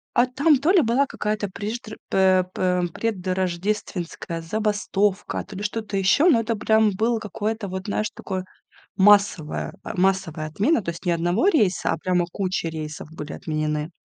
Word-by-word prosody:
А 245 Hz, -, +5 dB
там 280 Hz, +3 st, +3 dB
то 320 Hz, +6 st, +3 dB
ли 375 Hz, -4 st, +6 dB
была 255 Hz, +3 st, +2 dB
какая-то 210 Hz, -1 st, -2 dB
преждр 215 Hz, +3 st, -6 dB
пэ 185 Hz, -1 st, +4 dB
пэ 180 Hz, -1 st, +1 dB
предрождественская 185 Hz, -3 st, -2 dB
забастовка, 205 Hz, +1 st, -1 dB
то 195 Hz, -2 st, -10 dB
ли -, -, -5 dB
что-то 210 Hz, -1 st, -3 dB
еще, 200 Hz, -, +4 dB
но 240 Hz, -, +5 dB
это 230 Hz, 0 st, -1 dB
прям 220 Hz, 0 st, +3 dB
было 225 Hz, +2 st, +1 dB
какое-то 215 Hz, 0 st, -3 dB
вот, 190 Hz, +2 st, -5 dB
знаешь, 215 Hz, +1 st, -1 dB
такое 185 Hz, -2 st, -5 dB, 0.5 s
массовое 200 Hz, -5 st, +3 dB
а, -, -, -5 dB
массовая 180 Hz, -5 st, 0 dB
отмена, 220 Hz, -, +1 dB
то 170 Hz, -, -3 dB
есть 170 Hz, +3 st, -10 dB
не 175 Hz, -, +3 dB
1 175 Hz, -, +1 dB
рейса, 215 Hz, -, +2 dB
а -, -, -1 dB
прямо 180 Hz, 0 st, +1 dB
кучи 185 Hz, -3 st, -2 dB
рейсов 155 Hz, -2 st, -6 dB
были 150 Hz, -2 st, -7 dB
отменены. 155 Hz, 0 st, -2 dB
195 Hz, 160 wpm, -23 LUFS, 180-220 Hz, 0.5 s, ли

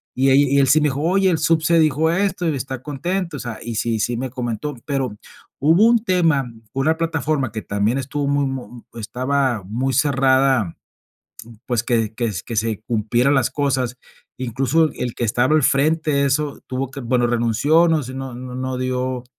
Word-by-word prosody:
Y 135 Hz, +2 st, +3 dB
ahí 140 Hz, +2 st, +6 dB
y 140 Hz, -, +3 dB
él 135 Hz, -, +4 dB
sí 150 Hz, +4 st, +5 dB
me 150 Hz, -, +3 dB
dijo: 135 Hz, +1 st, -3 dB
"Oye, 190 Hz, +4 st, +2 dB
el 165 Hz, -, +2 dB
subse 165 Hz, +1 st, +2 dB
dijo 155 Hz, +1 st, +2 dB
esto 185 Hz, -1 st, 0 dB
y 150 Hz, -, -1 dB
está 130 Hz, -1 st, -5 dB
contento", 170 Hz, +3 st, -3 dB
o -, -, -8 dB
sea, 120 Hz, -1 st, -6 dB
y 115 Hz, -1 st, -5 dB
sí 115 Hz, +1 st, -1 dB
sí 120 Hz, +3 st, -1 dB
me 130 Hz, +1 st, -3 dB
comentó. 125 Hz, +3 st, -4 dB
Pero 135 Hz, -6 st, -2 dB, 0.4 s
hubo 165 Hz, +9 st, +4 dB
un 230 Hz, -1 st, +4 dB
tema 165 Hz, -, +2 dB, 0.3 s
con 135 Hz, -, -1 dB
una 160 Hz, +3 st, +2 dB
plataforma 155 Hz, -6 st, -1 dB
que 110 Hz, -, -4 dB
también 105 Hz, +5 st, 0 dB
estuvo 140 Hz, +2 st, -3 dB
muy 140 Hz, 0 st, +1 dB
mu 130 Hz, -3 st, -6 dB
estaba 125 Hz, 0 st, -1 dB
muy 125 Hz, +7 st, -2 dB
cerrada, 135 Hz, -, +2 dB, 0.9 s
pues, 120 Hz, -2 st, 0 dB
que 115 Hz, -3 st, 0 dB
que 115 Hz, -1 st, -1 dB
que 115 Hz, -, -5 dB
se 110 Hz, -1 st, -1 dB
cumplieran 120 Hz, +4 st, +1 dB
las 130 Hz, -2 st, +2 dB
cosas. 130 Hz, -3 st, -1 dB, 0.4 s
Incluso 135 Hz, +6 st, +1 dB
el 125 Hz, -2 st, -4 dB
que 120 Hz, -, -2 dB
estaba 120 Hz, +6 st, +2 dB
al 155 Hz, -, +3 dB
frente, 145 Hz, +1 st, +2 dB
eso 145 Hz, +1 st, -1 dB
tuvo 130 Hz, 0 st, -3 dB
que 140 Hz, +1 st, -8 dB
bueno, 120 Hz, 0 st, +1 dB
renunció, 120 Hz, +8 st, +2 dB
no 160 Hz, -2 st, +2 dB
sé, 130 Hz, 0 st, -7 dB
no 135 Hz, -1 st, -6 dB
no 125 Hz, +1 st, -8 dB
no 130 Hz, 0 st, -3 dB
dio 130 Hz, 0 st, -2 dB
135 Hz, 190 wpm, -20 LUFS, 120-150 Hz, 0.9 s, ahí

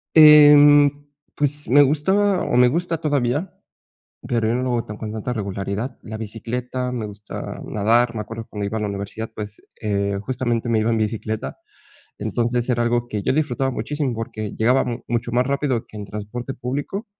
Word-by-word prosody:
Em, 145 Hz, -1 st, +8 dB, 0.5 s
pues, 145 Hz, 0 st, 0 dB
me 145 Hz, +4 st, +7 dB
gustaba, 190 Hz, +8 st, +2 dB
o -, -, -1 dB
me 125 Hz, 0 st, +6 dB
gusta 165 Hz, +5 st, -1 dB
todavía, 145 Hz, +2 st, -1 dB, 0.7 s
pero 115 Hz, -3 st, 0 dB
yo 115 Hz, -, +1 dB
no 125 Hz, -, -1 dB
lo 130 Hz, -, -1 dB
hago 105 Hz, -3 st, -6 dB
con 110 Hz, -1 st, -5 dB
tanta 110 Hz, +3 st, -3 dB
regularidad, 100 Hz, +2 st, -4 dB
la 110 Hz, 0 st, -7 dB
bicicleta, 125 Hz, +3 st, -4 dB
me 115 Hz, -4 st, -3 dB
gusta 105 Hz, 0 st, -8 dB
nadar. 115 Hz, +3 st, +2 dB
Me 110 Hz, -, -3 dB
acuerdo 115 Hz, +1 st, -7 dB
cuando 105 Hz, -1 st, -4 dB
iba 110 Hz, +2 st, -3 dB
a -, -, -4 dB
la 105 Hz, -, -1 dB
universidad, 100 Hz, +3 st, -5 dB
pues, 105 Hz, -1 st, -8 dB, 0.2 s
eh, 100 Hz, -2 st, -1 dB
justamente 120 Hz, -1 st, -2 dB
me 115 Hz, -2 st, +2 dB
iba 110 Hz, +2 st, +1 dB
en 115 Hz, -, +1 dB
bicicleta. 110 Hz, 0 st, -3 dB, 0.6 s
Entonces 120 Hz, +1 st, -1 dB
era 120 Hz, -1 st, +1 dB
algo 120 Hz, 0 st, 0 dB
que 105 Hz, -3 st, -3 dB
yo -, -, +1 dB
disfrutaba 135 Hz, -3 st, 0 dB
muchísimo, 145 Hz, 0 st, -2 dB
porque 110 Hz, -2 st, -5 dB
llegabamos 120 Hz, +1 st, +1 dB
mucho 120 Hz, 0 st, -2 dB
más 125 Hz, +1 st, +2 dB
rápido 140 Hz, -4 st, -1 dB
que 110 Hz, -, -13 dB
en 105 Hz, -, -6 dB
transporte 105 Hz, +6 st, -6 dB
público 145 Hz, -, -4 dB
120 Hz, 180 wpm, -22 LUFS, 110-135 Hz, 0.7 s, Em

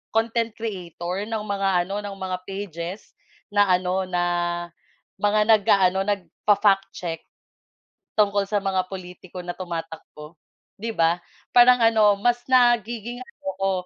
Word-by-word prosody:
content 230 Hz, 0 st, +1 dB
creator, 185 Hz, -3 st, -5 dB
ng 220 Hz, -2 st, -3 dB
mga 200 Hz, -2 st, -1 dB
ano, 195 Hz, +3 st, -4 dB
ng 205 Hz, -1 st, -6 dB
mga 185 Hz, -1 st, -3 dB
pages, 190 Hz, -1 st, -6 dB, 0.4 s
na 205 Hz, 0 st, +4 dB
ano, 185 Hz, +1 st, +1 dB
na 175 Hz, -1 st, 0 dB, 1.0 s
mga 210 Hz, +1 st, +2 dB
nag-aano 195 Hz, -4 st, +4 dB
nagfa-fact 200 Hz, 0 st, +2 dB
check. 165 Hz, -2 st, -4 dB, 1.0 s
Tungkol 200 Hz, -1 st, +3 dB
sa 205 Hz, 0 st, -1 dB
mga 190 Hz, -1 st, 0 dB
pulitiko 180 Hz, -1 st, -8 dB
na 175 Hz, 0 st, -5 dB
tumatakbo, 165 Hz, -3 st, -7 dB, 0.4 s
'di 225 Hz, +3 st, -4 dB
ba 165 Hz, -4 st, +2 dB, 0.4 s
parang 245 Hz, 0 st, +7 dB
ano, 220 Hz, -2 st, +5 dB
mas 240 Hz, +2 st, +2 dB
nagiging 240 Hz, -2 st, +2 dB
ano 255 Hz, -, -14 dB, 0.2 s
ko, 195 Hz, -, +2 dB
200 Hz, 125 wpm, -24 LUFS, 180-215 Hz, 1.0 s, parang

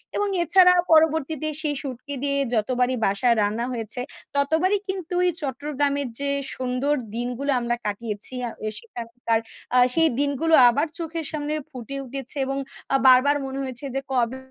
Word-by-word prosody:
এবং 410 Hz, -, +1 dB, 0.2 s
এছাড়া 360 Hz, +2 st, +7 dB, 0.2 s
পরবর্তীতে 315 Hz, -1 st, +3 dB
সেই 300 Hz, -2 st, -1 dB
শুঁটকি 275 Hz, +1 st, -7 dB
দিয়ে 280 Hz, 0 st, +1 dB, 0.2 s
যতবারই 250 Hz, +3 st, +1 dB
বাসায় 215 Hz, +5 st, +2 dB
রান্না 215 Hz, +3 st, 0 dB
হয়েছে। 230 Hz, 0 st, -2 dB, 0.4 s
ততবারই 320 Hz, +8 st, +2 dB
কিন্তু 370 Hz, -2 st, -4 dB
এই 360 Hz, -, +3 dB
চট্টগ্রামের 285 Hz, 0 st, -1 dB
যে 280 Hz, 0 st, -1 dB, 0.3 s
সুন্দর 255 Hz, +3 st, -1 dB, 0.2 s
দিনগুলো 245 Hz, +4 st, -2 dB
আমরা 240 Hz, 0 st, -1 dB
কাটিয়েছি। 210 Hz, +2 st, -2 dB
আ -, -, -5 dB, 0.3 s
সেখানকার 230 Hz, -, -3 dB, 0.4 s
আ -, -, +6 dB, 0.2 s
সেই 325 Hz, -1 st, +4 dB
দিনগুলো 285 Hz, +3 st, 0 dB, 0.2 s
আবার 290 Hz, +7 st, +1 dB
চোখের 330 Hz, -1 st, -4 dB
সামনে 300 Hz, -1 st, -3 dB, 0.2 s
ফুটে 255 Hz, 0 st, -7 dB
উঠেছে 270 Hz, +2 st, -4 dB
এবং 270 Hz, +1 st, -2 dB, 0.4 s
আ -, -, +5 dB
বারবার 260 Hz, +3 st, +6 dB
মনে 265 Hz, 0 st, -5 dB
হয়েছে 260 Hz, +1 st, -5 dB
যে 270 Hz, -, 0 dB
কবে 250 Hz, 0 st, 0 dB
275 Hz, 150 wpm, -24 LUFS, 245-305 Hz, 0.4 s, এছাড়া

